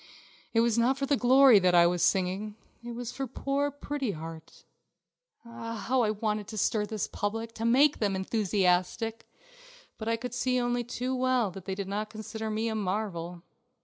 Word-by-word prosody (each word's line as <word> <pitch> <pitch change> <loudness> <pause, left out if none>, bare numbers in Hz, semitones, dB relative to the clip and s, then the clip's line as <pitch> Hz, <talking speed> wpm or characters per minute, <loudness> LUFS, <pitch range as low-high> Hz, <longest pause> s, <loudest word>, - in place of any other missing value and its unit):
It 225 - +3
was 235 0 +2
not 255 +3 +2
for 275 - -1
the 285 +1 +2
glory 260 -2 +6
that 180 -1 +3
I 170 0 +7
was 175 0 +1
singing; 190 +4 +1 0.3
it 240 0 -6
was 245 0 -5
for 270 -1 -4
poor 275 +3 -1
Pretty 285 -4 -4
Heart. 160 0 -10 0.8
Ah, 230 0 -7
how 250 +4 0
I 220 - +2
wanted 210 -1 -2
to 215 - -7
stir 210 0 +1
this 215 -2 -2
public, 225 +2 -3
to 225 0 -4
make 270 +5 +4
them 200 -3 0
enthusiastic.... 195 +2 0 0.7
But 220 - -5
I 230 - +2
could 245 +1 -6
see 255 +1 +1
only 245 0 0
too 250 +2 -3
well 255 -5 +1
that 185 0 -10
they 190 - -3
did 195 -1 -4
not 210 +2 -3
consider 220 0 -6
me 215 +1 -1
a 225 - -1
marvel. 185 -4 -3
220 Hz, 185 wpm, -29 LUFS, 200-245 Hz, 0.8 s, I